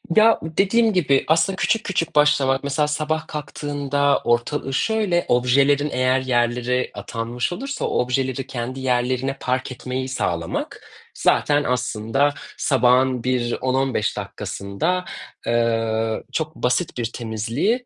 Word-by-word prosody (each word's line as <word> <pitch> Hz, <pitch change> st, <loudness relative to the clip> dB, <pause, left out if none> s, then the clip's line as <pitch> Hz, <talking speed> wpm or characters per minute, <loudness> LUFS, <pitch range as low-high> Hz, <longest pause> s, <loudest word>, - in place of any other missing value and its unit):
Ya, 220 Hz, +1 st, +6 dB
dediğim 200 Hz, +8 st, +2 dB
gibi 140 Hz, -7 st, +3 dB
aslında 165 Hz, +4 st, +3 dB
küçük 215 Hz, +3 st, +1 dB
küçük 170 Hz, -5 st, -2 dB
başlamak, 145 Hz, -2 st, +3 dB
mesela 150 Hz, +1 st, 0 dB
sabah 155 Hz, +1 st, -2 dB
kalktığında 145 Hz, -1 st, -1 dB
ortalığı 130 Hz, +3 st, 0 dB
şöyle 210 Hz, -2 st, +1 dB
objelerin 140 Hz, +4 st, +3 dB
eğer 130 Hz, -1 st, +2 dB
yerlere 125 Hz, 0 st, 0 dB
atanmış 115 Hz, -, -3 dB
olursa 275 Hz, +9 st, -4 dB
o -, -, 0 dB
objeleri 130 Hz, +1 st, -2 dB
kendi 130 Hz, +1 st, -5 dB
yerlerine 130 Hz, +1 st, 0 dB
park 130 Hz, +1 st, -2 dB
etmeyi 130 Hz, +1 st, -4 dB
sağlamak 85 Hz, -9 st, -3 dB, 0.3 s
zaten 145 Hz, 0 st, +2 dB
aslında 125 Hz, +3 st, 0 dB, 0.2 s
sabahın 130 Hz, -2 st, +3 dB
bir 125 Hz, -2 st, 0 dB
10-15 130 Hz, -5 st, 0 dB
dakikasında, 100 Hz, -, -3 dB, 0.4 s
eee, 115 Hz, -1 st, 0 dB
çok 160 Hz, 0 st, -3 dB
basit 125 Hz, +4 st, -1 dB
bir 120 Hz, -, -1 dB
temizliği 120 Hz, -, -1 dB
130 Hz, 120 wpm, -22 LUFS, 120-150 Hz, 0.4 s, Ya